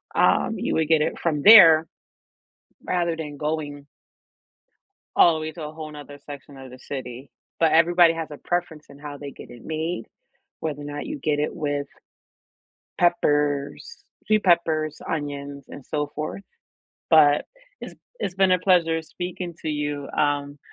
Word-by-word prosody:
um, - - +2
you - - -2
would 160 -1 +1
get 160 -2 +3
it - - -2
from 155 -4 -1
there 165 -7 +9 1.0
rather 170 -2 0
than 150 -3 -7
going 145 -2 -4 1.3
all 170 - +6
the 155 - -4
way 155 0 -4
to 160 -1 -9
a 150 - -6
whole 155 -1 -8
'nother 145 -1 -11
section 140 -1 -11
of 130 -1 -11
the 130 - -12
city. 130 -1 -8 0.3
But, 165 -1 +3
everybody 170 0 +5
has 165 -1 -5
a 145 - -8
preference 175 -3 -3
in 140 0 -15
how 145 -1 -8
they 140 -1 -8
get - - -13
it 120 -2 -13
made, 160 +2 -3 0.5
whether 150 -2 -4
or - - -8
not 145 0 -6
you 300 0 -5
get 150 - -1
it 150 - -2
with 145 -1 -2 1.1
peppers, 145 - 0 0.2
sweet 215 -1 +2
peppers, 160 -3 +1
onions, 140 -2 -5
and 140 - -11
so 150 -1 -3
forth. 155 +6 -5 0.7
But, 150 -2 +5 0.4
it's - - -9 0.3
it's 185 - -3
been 190 -1 +3
a 180 - +3
pleasure 165 -3 +2
speaking 175 +1 -6
to 160 - -3
you. 145 -1 -3
Um, 145 -1 -1
155 Hz, 160 wpm, -23 LUFS, 145-165 Hz, 1.3 s, there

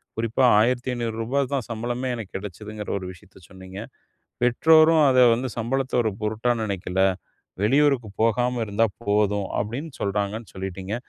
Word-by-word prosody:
குறிப்பா 115 +3 0 0.2
1,500 120 -1 0
ரூபா 125 +5 -1
தா 140 - +1
சம்பளமே 120 +3 -3
எனக்கு 110 -5 -8
கிடைச்சிதுங்கிற 105 +2 -8
ஒரு 95 - -6
விஷயத்த 90 +1 -17
சொன்னீங்க. 95 0 -10 0.6
பெற்றோரும் 155 +6 +5
அதை 130 -1 +5
வந்து 130 +2 -3
சம்பளத்த 130 +3 -2
ஒரு 110 -3 -1
பொருட்டா 110 +3 0
நினைக்கல. 95 -3 -2 0.6
"வெளியூருக்கு 135 -2 +2
போகாம 120 +2 +1
இருந்தா 105 +2 +2 0.2
போதும்" 105 -1 +1
அப்படின்னு 125 +10 -4
சொல்றாங்கன்னு 100 +2 -3
சொல்லிட்டீங்க. 95 +1 -5
115 Hz, 130 wpm, -24 LUFS, 100-125 Hz, 0.6 s, பெற்றோரும்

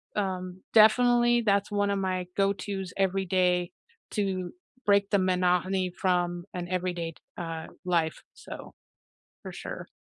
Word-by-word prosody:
um 185 -2 -3
definitely 240 +2 +6
that's 200 -2 +1
one 205 0 +1
of 200 - 0
my 185 -1 -1
go-to's 195 -1 -1
every 195 0 +1
day 180 -1 +2 0.4
to 190 -4 -1 0.3
break 200 -1 +4
the 200 - +5
monotony 185 0 +1
from 175 -2 0
an 175 -1 -4
everyday 175 -2 -2
d - - -20 0.2
uh, 165 -2 -5 0.2
life, 165 -3 0
so - - -10 0.7
for - - -7
sure. - - -7
185 Hz, 130 wpm, -28 LUFS, 180-200 Hz, 0.7 s, definitely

